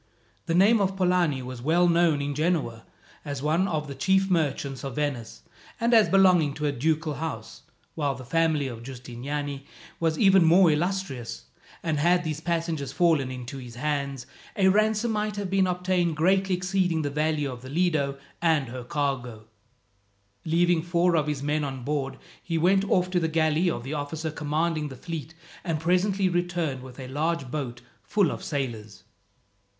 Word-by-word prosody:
The 165 - +1
name 205 +4 +5
of 195 0 0
Polani 180 -7 +2
was 125 -1 -7
well 170 +6 +3
known 170 -4 +3
in 145 0 -2
Genoa 150 -7 -1 0.4
as 140 -2 -5
one 165 +6 +2
of 155 -4 -2
the 140 - -6
chief 190 +7 +2
merchants 140 -5 -1
of 135 -3 -5
Venice 140 -7 -3 0.4
and 235 +2 +2
as 220 -2 +6
belonging 180 -7 +4
to 150 - -3
a 145 - +2
ducal 155 +3 0
house, 145 -7 -6 0.3
while 145 -4 -1
the 130 +1 -10
family 155 0 +1
of 115 -3 -7
Giustiniani 135 +3 -6 0.3
was 160 -1 +1
even 195 -3 +5
more 170 +1 +6
illustrious; 165 -6 -2 0.4
and 160 -3 0
had 175 +3 +3
these 155 -1 -3
passengers 165 -4 -2
fallen 160 -6 +2
into 130 +1 -7
his 120 -2 -10
hands, 140 -1 -2 0.3
a 190 -2 +4
ransom 215 +3 +2
might 210 -1 -1
have 200 -2 -4
been 195 -1 +3
obtained 180 -2 0
greatly 190 +3 +2
exceeding 180 -3 0
the 145 - -2
value 150 -1 0
of 125 -1 -9
the 130 - -10
Lido 150 -4 0 0.2
and 160 -6 +2
her 125 0 -6
cargo. 125 -5 -3 1.0
Leaving 170 +1 +2
four 175 +1 +2
of 155 -2 +1
his 145 -2 -2
men 150 +1 0
on 135 -3 -5
board 135 -1 -2 0.2
he 165 -2 -2
went 190 +4 +3
off 180 -1 +2
to 180 - +2
the 165 - 0
galley 160 +2 +2
of 120 - -3
the 135 +4 -5
officer 155 +2 -3
commanding 155 +1 -1
the 135 - -8
fleet, 160 +2 -7 0.3
and 165 -3 -1
presently 185 +4 +2
returned 175 -6 -1
with 130 0 -11
a 130 - -6
large 145 0 -2
boat 125 -5 -4 0.2
full 205 -3 +1
of - - -6
sailors. 110 -8 -4
155 Hz, 175 wpm, -26 LUFS, 140-175 Hz, 1.0 s, as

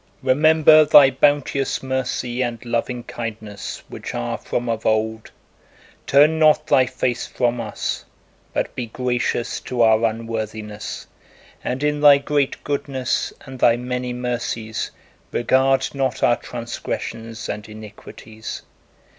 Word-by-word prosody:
Remember 155 +2 +6
Thy 145 -2 +7
bounteous 140 0 +1
mercy 130 -1 -2
and 120 -2 -3
loving 120 +1 -2
kindness 110 -4 -6
which - - -7
are - - -2
from 120 0 -3
of 115 -1 -2
old; 110 0 0 0.8
turn 150 +3 +5
not 155 -1 +5
Thy 130 -1 +4
face 125 -1 -2
from 120 -1 0
us, 110 -2 -4 0.5
but - - -2
be 125 -2 -4
gracious 125 0 -1
to 120 -2 0
our 110 0 +4
unworthiness, 110 -2 -4 0.6
and 130 +3 -3
in 150 0 0
Thy 145 -1 +8
great 140 0 -1
goodness 135 -3 -2
and 130 -2 -9
Thy 115 0 +5
many 125 0 -3
mercies 120 -3 -3 0.4
regard 130 +2 +2
not 135 -2 -1
our 120 - +4
transgressions 115 -1 -6
and 105 +1 -5
iniquities! 110 +1 -9
125 Hz, 120 wpm, -21 LUFS, 115-135 Hz, 0.8 s, Thy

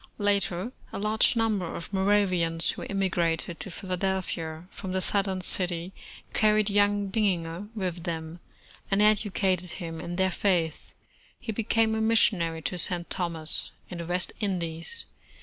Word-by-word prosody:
52 - - -5
America 200 -3 +3
Later, 220 +9 -4 0.2
a - - -2
large 215 +3 +3
number 215 -7 0
of 170 - -7
Moravians, 185 -4 +3
who - - -8
immigrated 175 -4 0
to - - -5
Philadelphia 180 -3 -2
from 190 -2 -6
the 190 - +2
Southern 190 -1 0
city, 180 0 -1 0.4
carried 215 -1 +4
young 205 0 +3
Bininger 185 -3 0
with 180 -4 -2
them, 165 -1 -4 0.5
and 195 - +2
educated 195 -4 +2
him 165 -3 -6
in 175 - -4
their 190 +1 +2
faith. 170 -4 0 0.5
He 230 - -4
became 225 +1 +2
a 220 - 0
missionary 175 -8 +2
to 175 +7 -2
St. 175 +1 +1
Thomas, 165 -3 -1 0.2
in 180 - -6
the 170 - -4
West 180 +1 -1
Indies. 180 - -1
185 Hz, 150 wpm, -28 LUFS, 170-205 Hz, 0.5 s, carried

